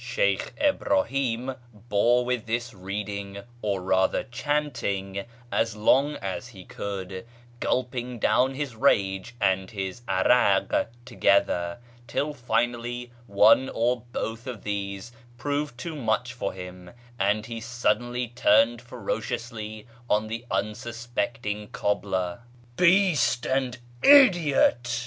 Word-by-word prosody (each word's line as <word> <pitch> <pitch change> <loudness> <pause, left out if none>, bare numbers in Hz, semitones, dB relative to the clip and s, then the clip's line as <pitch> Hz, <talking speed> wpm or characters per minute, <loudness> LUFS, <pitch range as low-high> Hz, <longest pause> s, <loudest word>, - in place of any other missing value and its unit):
Sheykh - - 0
Ibrahim 135 - +1 0.2
bore 115 +3 +2
with 125 -3 -2
this 120 +2 -2
reading, 100 +1 -5 0.2
or 100 -3 -1
rather 95 0 +2
chanting, 120 -8 -2 0.3
as 115 -1 0
long 135 +7 +3
as 100 +2 -5
he 95 -7 -12
could, 95 -2 -5 0.4
gulping 125 -1 -1
down 130 +4 +2
his 140 -4 -4
rage 100 -3 +1
and 95 -2 +1
bis 95 0 -5
'arak 95 +1 +3 0.2
together, 100 -7 +2 0.3
till 145 +6 -1
finally 120 -1 -2 0.2
one 105 +6 +5
or 120 +1 0
both 115 +2 -4
of 120 -6 -6
these 100 +1 -4 0.3
proved 145 0 -2
too 160 +5 -5
much 125 -2 -1
for 120 -5 -3
liim, 90 +1 -10 0.2
and 105 +2 +1
he 115 0 -6
suddenly 120 +1 0
turned 115 0 +3
ferociously 115 -2 -5 0.2
on 105 +1 +2
the 115 +2 -5
unsuspecting 115 0 -3
(■(jbbler. 95 -4 -1 0.2
" 120 0 -27
Beast 175 -8 +3
and 130 -2 0 0.2
idiot 165 - +5
115 Hz, 115 wpm, -26 LUFS, 100-125 Hz, 0.4 s, one